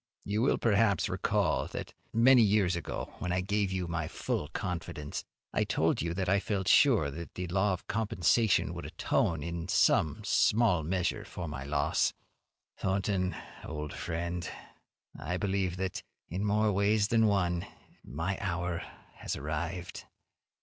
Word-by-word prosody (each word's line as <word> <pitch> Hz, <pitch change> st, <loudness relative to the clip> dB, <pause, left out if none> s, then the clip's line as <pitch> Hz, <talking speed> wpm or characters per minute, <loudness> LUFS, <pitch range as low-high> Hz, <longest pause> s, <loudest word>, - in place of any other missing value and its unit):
You 105 Hz, +2 st, 0 dB
will, 130 Hz, -, +3 dB
perhaps, 105 Hz, -2 st, +3 dB
recall -, -, +1 dB
that -, -, -6 dB, 0.2 s
many 120 Hz, +2 st, +6 dB
years 100 Hz, -4 st, +3 dB
ago, 85 Hz, -, -5 dB
when 90 Hz, -, -2 dB
I 90 Hz, +1 st, +1 dB
gave 100 Hz, +1 st, 0 dB
you 95 Hz, -2 st, -2 dB
my 85 Hz, -2 st, -2 dB
full 75 Hz, -, -2 dB
confidence, 85 Hz, -3 st, -4 dB, 0.3 s
I -, -, +2 dB
told -, -, +1 dB
you 85 Hz, +1 st, -2 dB
that 95 Hz, -1 st, -1 dB
I 100 Hz, +2 st, +4 dB
felt 100 Hz, -2 st, -2 dB
sure 105 Hz, -, +5 dB
that 85 Hz, +4 st, -8 dB
the 90 Hz, -, -3 dB
law 95 Hz, +2 st, +2 dB
of 90 Hz, -, -6 dB
compensation 110 Hz, 0 st, +2 dB
would -, -, -6 dB
atone 80 Hz, -4 st, 0 dB
in 85 Hz, 0 st, -4 dB
some 80 Hz, 0 st, +3 dB, 0.7 s
measure 90 Hz, -1 st, 0 dB
for 85 Hz, -2 st, -6 dB
my 65 Hz, -3 st, -5 dB
loss. 70 Hz, +2 st, +1 dB, 0.7 s
Thornton, 95 Hz, -1 st, 0 dB, 0.3 s
old 75 Hz, -1 st, -5 dB
friend, 85 Hz, 0 st, -3 dB, 0.7 s
I 90 Hz, +4 st, -2 dB
believe 95 Hz, -1 st, -1 dB
that, 95 Hz, -1 st, -3 dB, 0.3 s
in 95 Hz, +4 st, -3 dB
more 105 Hz, +1 st, +2 dB
ways 105 Hz, +1 st, +2 dB
than 115 Hz, -1 st, +4 dB
one, 90 Hz, -4 st, +1 dB, 0.4 s
my 80 Hz, +9 st, -3 dB
hour 90 Hz, -3 st, -2 dB, 0.4 s
has -, -, -3 dB
arrived. 80 Hz, +4 st, -4 dB
90 Hz, 145 wpm, -30 LUFS, 85-100 Hz, 0.7 s, many